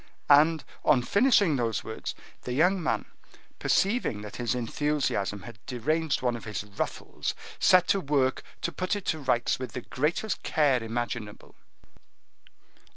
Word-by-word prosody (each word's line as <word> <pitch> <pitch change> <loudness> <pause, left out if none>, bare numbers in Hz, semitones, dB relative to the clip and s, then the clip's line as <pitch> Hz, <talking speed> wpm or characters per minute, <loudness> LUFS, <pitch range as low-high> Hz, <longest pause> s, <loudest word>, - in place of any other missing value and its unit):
And, 155 +3 +6 0.2
on 130 -5 +4
finishing 200 - +4
those 115 -3 -1
words, 110 - -5 0.3
the 125 - -4
young 180 +7 +3
man, 160 - -1 0.5
perceiving 200 - +1
that 105 0 -8
his 120 -1 -1
enthusiasm 120 -6 -1
had 110 +1 -11
deranged 150 +4 0
one 120 -1 +1
of 115 - -8
his 105 -3 -4
ruffles, 105 -1 -4 0.2
set 180 -1 +5
to 200 - +4
work 140 -3 +1 0.2
to - - 0
put 185 +3 -1
it 205 - -5
to 160 - -8
rights 125 -4 +1
with 125 -4 -6
the 125 - -4
greatest 155 - -1
care 140 -5 +2
imaginable. 115 -2 -4
130 Hz, 145 wpm, -28 LUFS, 115-160 Hz, 0.5 s, And